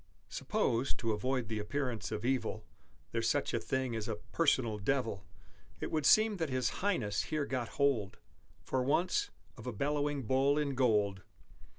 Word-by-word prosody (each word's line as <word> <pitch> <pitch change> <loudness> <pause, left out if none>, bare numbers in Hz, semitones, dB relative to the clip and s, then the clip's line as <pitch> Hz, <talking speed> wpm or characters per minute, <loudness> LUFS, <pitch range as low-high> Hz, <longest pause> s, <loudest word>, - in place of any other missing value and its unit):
Suppose 120 +4 0
(to 115 - -1
avoid 125 +2 -1
the 110 -1 -2
appearance 125 +2 -2
of 105 +2 -3
evil) 120 -4 -1 0.5
There's - - +1
such - - 0
a - - +2
thing 130 -3 -1
as 110 0 -3
a 110 - -1
Personal 115 0 +1
Devil, 110 -3 -1 0.5
It - - -4
would 155 -3 +2
seem 215 -1 +5
that 160 -4 -1
his 130 -1 +1
Highness 125 - 0
here 155 -2 -1
got 125 -4 -2
hold, 130 -9 +1 0.5
For 130 - 0
once, 155 +8 +1 0.3
of 110 - -9
a - - -1
bellowing 145 +4 -1
Bull 135 +5 +3
in 145 -2 0
Gold! 105 -7 +2
130 Hz, 165 wpm, -33 LUFS, 110-140 Hz, 0.5 s, seem